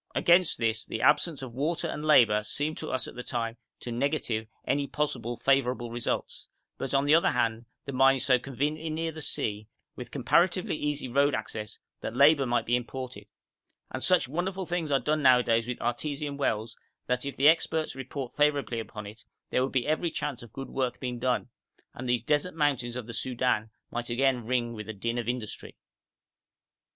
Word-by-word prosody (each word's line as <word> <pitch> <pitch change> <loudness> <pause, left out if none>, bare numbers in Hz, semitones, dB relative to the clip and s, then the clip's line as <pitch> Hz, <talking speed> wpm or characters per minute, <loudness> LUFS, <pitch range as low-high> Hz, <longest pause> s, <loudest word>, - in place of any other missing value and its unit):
Against 175 0 +4
this 115 -1 0
the 110 - -3
absence 155 -6 +3
of 125 -3 -7
water 160 +6 -1
and 150 - -4
labour 115 -9 +5
seemed 145 +8 -2
to - - -5
us 130 -3 0
at - - -9
the 125 - -6
time 115 -2 -3 0.2
to 120 - -5
negative 120 -4 -1 0.2
any 140 +1 0
possible 125 -6 -2
favourable 125 -3 +1
results; 120 0 -3 0.3
but, 135 0 -2
on 135 +1 +3
the 145 - +5
other 165 - +5
hand, 115 -2 0 0.2
the 140 - -4
mine 135 +1 +5
is 130 - -1
so 130 -2 +4
conveniently 145 +5 -2
near 160 +1 -2
the 160 0 -8
sea, 105 -6 -2 0.3
with - - -8
comparatively 180 -1 +2
easy 150 -3 -2
road 140 +3 +3
access, 105 -1 -5 0.2
that 115 - -5
labour 140 0 +6
might 120 -1 +1
be 120 - +2
imported; 125 +1 -5 0.6
and 130 - -3
such 180 -9 +4
wonderful 185 +6 -2
things 175 -3 -2
are 140 -1 +3
done 155 +2 0
nowadays 120 -3 +4
with 125 - -3
artesian 140 +4 -2
wells 115 -5 -1 0.3
that, 125 0 0
if 140 0 -5
the 140 - +5
experts 160 0 +3
report 130 -1 -6
favourably 145 -5 +1
upon 110 -1 -7
it, 110 +2 -11 0.3
there - - +2
would 130 - 0
be 130 -2 +1
every 155 +3 +1
chance 150 -6 -4
of 120 -3 -12
good 135 +2 -7
work 130 -2 -1
being 125 -2 -4
done, 125 0 0 0.5
and 125 0 -6
these 120 -2 +1
desert 150 +6 +1
mountains 135 -6 0
of 125 -3 -4
the 115 - -8
Soudan 120 -2 0 0.2
might 120 0 -3
again 125 -1 +1
ring 120 -2 0
with 105 -1 -7
the 110 - -4
din 115 +4 -2
of 120 0 -3
industry. 120 -4 -5
130 Hz, 190 wpm, -28 LUFS, 120-150 Hz, 0.6 s, labour